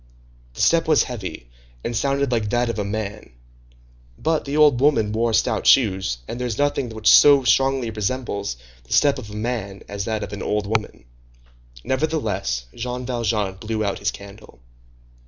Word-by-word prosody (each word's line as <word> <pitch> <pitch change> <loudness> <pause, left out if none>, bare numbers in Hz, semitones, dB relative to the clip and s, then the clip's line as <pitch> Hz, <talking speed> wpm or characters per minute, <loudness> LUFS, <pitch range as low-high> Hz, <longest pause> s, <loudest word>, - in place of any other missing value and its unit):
The - - -4
step 165 -1 +3
was 155 -3 +4
heavy, 95 - -7 0.3
and 120 - -3
sounded 140 +2 0
like 110 -3 0
that 120 +1 +1
of 115 - -3
a - - 0
man; 105 +1 -5 0.9
but 160 -1 0
the 140 +1 -2
old 150 -5 +5
woman 125 -8 +3
wore 115 +2 0
stout - - +1
shoes, 95 - +3
and 120 - -6
there 125 - -2
is 115 -2 -4
nothing 145 -3 0
which 110 -1 -4
so 140 -2 +7
strongly 135 -2 +2
resembles 105 - -3 0.3
the - - -6
step 145 -2 +3
of 110 -5 -9
a 105 - -9
man 105 -3 -4
as 100 0 -5
that 110 -1 -2
of 100 - -7
an 100 - -6
old 105 0 -1
woman. 105 - -3 0.8
Nevertheless, 110 - -1
Jean 125 +1 -5
Valjean 110 -6 -1
blew 110 +1 -3
out 100 - -2
his - - 0
candle. 100 - -12
115 Hz, 175 wpm, -22 LUFS, 100-130 Hz, 0.9 s, so